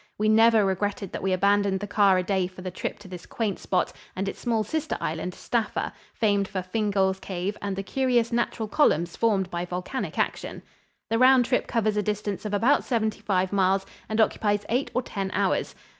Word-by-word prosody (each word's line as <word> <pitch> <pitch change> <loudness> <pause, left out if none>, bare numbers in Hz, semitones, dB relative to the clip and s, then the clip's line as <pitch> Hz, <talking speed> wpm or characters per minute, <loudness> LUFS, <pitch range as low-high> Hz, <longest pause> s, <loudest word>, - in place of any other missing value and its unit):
We 215 +1 +2
never 225 -1 +5
regretted 195 0 -2
that - - -5
we 190 - 0
abandoned 200 +1 +2
the 205 - -4
car 200 -2 +4
a 185 - +1
day 190 -1 0
for 185 0 -12
the 185 - -4
trip - - -4
to 205 - -13
this 180 -2 -9
quaint 215 -5 -2
spot 185 - 0 0.2
and 190 +1 -2
its - - -5
small 225 -2 0
sister 315 +5 -2
island, 165 +3 -3
Staffa, 230 -3 -2 0.2
famed 205 -4 +2
for 190 -2 -4
Fingall's 195 -1 0
cave 190 +2 -3
and 200 -1 -2
the 195 - -4
curious 245 +1 +1
natural 235 -2 -1
columns 175 - +2
formed 200 -5 +1
by 175 0 -2
volcanic 180 +8 -4
action. - - -2 0.5
The 225 - +2
round 255 -1 +6
trip 250 - 0
covers 215 -3 0
a - - +3
distance 210 0 -3
of 210 - -3
about 240 +8 +3
seventy 220 -4 -1
five 190 -1 0
miles 195 0 +2 0.2
and 220 +1 -1
occupies 205 -2 +2
eight 250 +5 0
or 250 - +1
ten 195 -4 -4
hours. 195 -2 0
205 Hz, 200 wpm, -26 LUFS, 190-225 Hz, 0.5 s, round